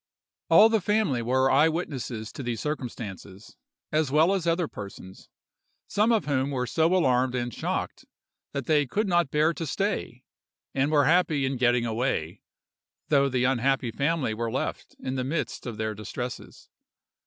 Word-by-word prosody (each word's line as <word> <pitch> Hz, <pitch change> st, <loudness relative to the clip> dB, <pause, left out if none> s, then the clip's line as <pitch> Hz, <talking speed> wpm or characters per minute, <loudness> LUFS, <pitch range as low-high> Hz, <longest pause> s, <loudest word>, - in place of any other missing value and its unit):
"All 215 Hz, -, +8 dB
the 220 Hz, -2 st, +2 dB
family 205 Hz, -, +1 dB
were 130 Hz, +3 st, +2 dB
eye 150 Hz, +4 st, +5 dB
witnesses 130 Hz, -9 st, -4 dB
to -, -, -7 dB
these 120 Hz, -3 st, -3 dB
circumstances, 115 Hz, -8 st, -6 dB, 0.4 s
as 155 Hz, -2 st, +1 dB
well 155 Hz, +7 st, +4 dB
as 185 Hz, -4 st, -1 dB
other 170 Hz, 0 st, +1 dB
persons, 100 Hz, -4 st, -10 dB, 0.6 s
some 215 Hz, +3 st, +2 dB
of 225 Hz, -2 st, +2 dB
whom 140 Hz, -2 st, 0 dB
were 130 Hz, -3 st, -1 dB
so 160 Hz, +8 st, +2 dB
alarmed 130 Hz, -6 st, +2 dB
and 120 Hz, -1 st, -2 dB
shocked, -, -, -3 dB, 0.5 s
that 140 Hz, -3 st, -4 dB
they 150 Hz, -3 st, +2 dB
could 210 Hz, -, -1 dB
not 175 Hz, -5 st, +2 dB
bear 155 Hz, +3 st, +2 dB
to 165 Hz, -1 st, -5 dB
stay, 185 Hz, -, -2 dB, 0.5 s
and 135 Hz, +2 st, +1 dB
were 145 Hz, -2 st, +4 dB
happy 160 Hz, -3 st, +3 dB
in 135 Hz, +1 st, -1 dB
getting 120 Hz, -1 st, +2 dB
away, 115 Hz, -8 st, -2 dB, 0.7 s
though 140 Hz, -2 st, +4 dB
the 125 Hz, -1 st, 0 dB
unhappy 130 Hz, 0 st, +1 dB
family 140 Hz, -1 st, 0 dB
were 115 Hz, +1 st, -3 dB
left -, -, -4 dB
in 130 Hz, -, -4 dB
the 130 Hz, -, -1 dB
midst 145 Hz, 0 st, -3 dB
of 115 Hz, -3 st, -5 dB
their 110 Hz, 0 st, -2 dB
distresses. 120 Hz, +4 st, -7 dB
135 Hz, 165 wpm, -26 LUFS, 120-160 Hz, 0.7 s, All